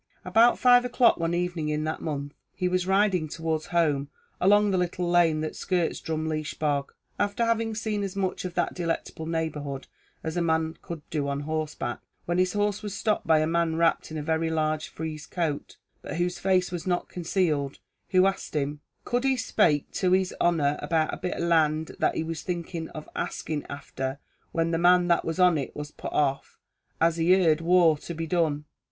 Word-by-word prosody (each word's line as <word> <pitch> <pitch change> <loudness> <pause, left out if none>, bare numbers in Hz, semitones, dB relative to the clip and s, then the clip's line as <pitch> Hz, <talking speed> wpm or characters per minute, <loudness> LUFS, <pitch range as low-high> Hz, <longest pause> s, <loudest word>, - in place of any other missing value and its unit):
About 235 +2 +5
five 245 -1 +6
o'clock 245 -1 +4
one 165 0 0
evening 175 -3 -1
in 150 0 -1
that 155 0 -3
month, 145 -2 -4 0.2
he 180 - 0
was 180 0 0
riding 190 -4 +2
towards 160 0 -2
home 150 -5 +1 0.3
along 205 +2 +4
the 190 - +2
little 180 0 -1
lane 170 -3 +3
that 155 - -4
skirts 180 -3 -1
Drumleesh 155 -1 -3
bog, 145 -2 0 0.3
after 205 +3 +1
having 230 -1 0
seen 215 -1 -2
as 195 -1 -4
much 190 -2 -1
of 180 -1 -5
that - - 0
delectable 165 -2 -3
neighbourhood 150 -4 -3 0.4
as 160 +1 -3
a 175 - +1
man 160 -1 +1
could 165 -3 -8
do 150 -3 -1
on 140 0 -2
horseback, 155 -5 -3 0.3
when 175 +1 0
his 185 0 +2
horse 205 -1 0
was 205 -2 -5
stopped 215 +1 0
by 160 -1 +5
a - - +2
man 165 0 +1
wrapped 165 0 +2
in 160 - -5
a 150 - -3
very 160 +1 0
large 155 -1 0
frieze 155 -2 -6
coat, 160 -5 -3 0.2
but - - -6
whose 175 +1 -1
face 185 -1 +2
was 175 0 -5
not 175 -1 0
concealed, 165 -6 -1 0.3
who 185 -1 +5
asked 195 -4 -2
him, 145 0 -1 0.3
"could 245 +1 0
he 270 -1 +2
spake 155 - +2
to 185 -1 +1
his 190 -1 +2
honer 150 -4 +2
about 160 -2 0
a - - -3
bit 180 0 -3
of - - -2
land 160 -2 +2
that - - +2
he - - -1
was 165 -1 -4
thinking 170 -2 -4
of 155 - -9
axing 150 -2 -3
afther, 135 -1 -5 0.3
when 165 0 0
the 165 - 0
man 180 0 +5
that 170 - +3
was 165 +1 -3
on 180 -4 +5
it 135 - -5
was 150 0 -6
put - - -7
off, 140 -2 0 0.4
as 165 0 +3
he 175 +3 +4
heard 160 -1 +3
war 170 -2 +5
to 165 +3 -8
be 165 +1 -3
done." 155 -3 0
165 Hz, 200 wpm, -27 LUFS, 155-180 Hz, 0.4 s, five